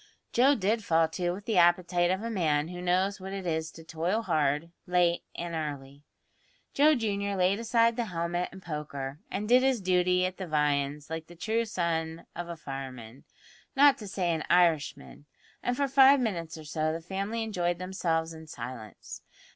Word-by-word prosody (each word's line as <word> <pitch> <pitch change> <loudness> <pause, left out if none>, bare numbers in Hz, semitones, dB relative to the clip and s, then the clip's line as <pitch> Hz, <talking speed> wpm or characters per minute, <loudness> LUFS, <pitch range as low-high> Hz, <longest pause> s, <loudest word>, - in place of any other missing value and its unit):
Joe 270 +4 +5
did 215 +1 0
fall 165 -3 +3
to 175 +2 -2
with 195 +3 -5
the 215 -5 +2
appetite 175 0 +3
of 190 +3 -1
a 230 - -3
man 155 -6 +1
who 180 0 -7
knows 185 +3 +1
what 190 +1 -7
it 195 -1 -5
is 160 -2 -1
to 165 - -12
toil 170 +7 -1
hard, 155 -2 0 0.2
late 175 -1 +2
and 170 0 -5
early. 145 -3 -5 0.7
Joe 300 +2 +5
junior 200 -4 -1
laid 190 +2 +2
aside 230 0 +3
the 240 - 0
helmet 175 -2 -2
and 190 0 -12
poker, 145 -3 -5
and 205 +2 -3
did 250 +2 +6
his 265 -2 +2
duty 180 -1 +2
at 185 0 -4
the 190 - -5
viands 150 -1 0
like 160 0 -5
the 175 - -13
true 225 +6 -1
son 165 -4 -2
of 175 0 -5
a 170 - -6
fireman 130 -4 -8 0.5
not 280 0 +6
to 210 - -8
say 185 -2 -1
an 160 -2 -1
Irishman 165 -4 +1 0.3
and 245 0 -1
for 280 - +1
five 270 +1 +6
minutes 170 -10 -3
or 155 - -9
so 155 +1 -1
the 165 - -3
family 195 +6 -3
enjoyed 175 -5 -1
themselves 165 -3 -1
in 160 0 -11
silence. 115 -5 -8
175 Hz, 185 wpm, -29 LUFS, 160-200 Hz, 0.7 s, did